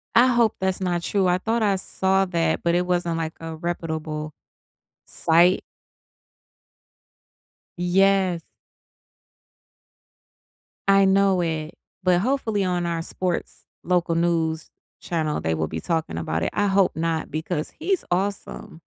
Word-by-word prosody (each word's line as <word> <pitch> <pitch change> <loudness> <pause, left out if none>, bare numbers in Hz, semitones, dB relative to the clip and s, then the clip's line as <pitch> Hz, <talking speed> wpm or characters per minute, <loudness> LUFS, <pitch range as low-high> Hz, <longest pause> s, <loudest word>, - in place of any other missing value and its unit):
I 240 +3 +7
hope 235 -3 +3
that's 190 -1 -1
not 175 -2 0
true. 195 +2 +1
I 180 0 +2
thought 225 +3 0
I 200 -2 +3
saw 190 0 +1
that, 170 -3 0
but 170 0 +2
it 180 +1 +1
wasn't, 175 -2 0
like, 160 -1 -3
a 165 0 -6
reputable 160 -2 -4 0.7
site. 175 +3 +3 2.1
Yes. 185 0 +2 2.4
I 195 0 +6
know 195 -1 +3
it. 160 -2 -3 0.3
But 180 -1 +4
hopefully 225 -4 0
on 180 -1 0
our 170 -1 -1
sports 180 +1 -4 0.2
local 175 -1 +1
news 165 -1 0 0.3
channel, 160 -3 -2
they 80 - 0
will 80 0 -1
be 80 - -4
talking 160 - -2
about 80 0 -2
it. - - 0
I 205 - +1
hope 195 -1 +2
not 160 -1 -2
because 155 +1 -3
he's 365 +3 0
awesome. 190 -3 -3
175 Hz, 130 wpm, -24 LUFS, 165-195 Hz, 2.4 s, I